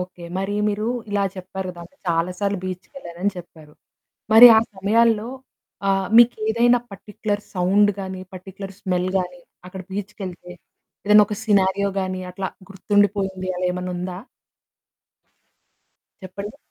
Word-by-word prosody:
Okay. 180 -1 -8
మరి 195 +1 -2
మీరు 210 +1 -2 0.2
ఇలా 200 -1 +1
చెప్పారు 185 0 -6
కదా! 175 -1 -12
అంటే 280 - -19
చాలా 165 +2 +1
సార్లు 200 -1 0
బీచ్‌కెళ్ళానని 185 0 -5
చెప్పారు. 160 -3 -13 0.6
మరి 240 +2 +12
ఆ - - +8 0.2
సమయాల్లో 220 +3 +2 0.6
ఆహ్, 195 -1 +1
మీకేదైనా 235 +1 +4
పర్టిక్యులర్ 205 +1 -4
సౌండ్ 195 +3 +3
గాని, 190 -1 -6
పర్టిక్యులర్ 195 +1 -9
స్మెల్ 180 -1 -1
గాని 180 -1 -4 0.2
అక్కడ 185 +1 -8
బీచ్‌కెళ్తే 190 -3 -7 0.5
ఏదైనా 210 +1 +7
ఒక 210 - -4
సినారియో 200 -1 +2
గాని 185 -1 -3
అట్లా 190 +1 -4 0.2
గుర్తుండిపోయింది 195 -1 0
అలా 180 0 -2
ఏమైనా 180 0 -4
ఉందా? 180 0 -5 2.1
చెప్పండి. 200 +5 -8
190 Hz, 120 wpm, -22 LUFS, 180-205 Hz, 2.1 s, మరి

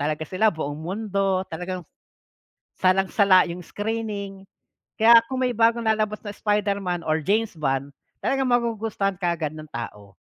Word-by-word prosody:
talaga 150 +2 -1
sila 185 +7 +2
buong 155 -5 -3
mundo, 195 +1 -1
talagang 180 +2 -5 1.0
salang-sala 190 0 +4
yung 175 +1 -6
screening. 205 -1 -4 0.6
Kaya 230 +1 +9
kung 260 +2 -3
may 250 -1 0
bagong 230 +1 +3
lalabas 215 -1 0
na 210 - -7
Spider-Man 200 -4 0
or 155 0 +1
James 215 0 +1
Bond 135 -2 -1 0.3
talagang 270 -1 0
magugustuhan 225 -5 0
kaagad 170 -4 -2
ng 155 - -8
tao. 105 -4 -7
195 Hz, 135 wpm, -24 LUFS, 170-220 Hz, 1.0 s, Kaya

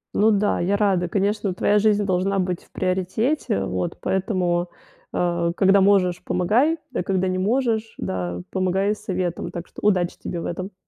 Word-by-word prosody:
Ну 215 +2 +4
да, 205 -1 +2
я 195 +4 +1
рада. 190 -4 +1
Конечно, 200 -1 0
твоя 205 +3 +3
жизнь 210 -1 +2
должна 190 +1 0
быть 180 -2 -1
в - - -26
приоритете. 185 - -1
Вот. 90 -1 -3
Поэтому, 180 -2 0 0.4
э, 170 -1 0
когда 195 0 +5
можешь, 190 -3 +3
помогай, 235 - +2 0.2
а - - 0
когда 190 0 0
не 185 0 -1
можешь, 225 +1 0
да, 90 -1 -3
помогай 190 +2 +1
советом. 185 -4 -3
Так 170 0 -7
что - - -12
удачи 185 -4 +1
тебе 175 - -4
в - - -5
этом. 185 +3 -5
190 Hz, 165 wpm, -23 LUFS, 175-205 Hz, 0.4 s, когда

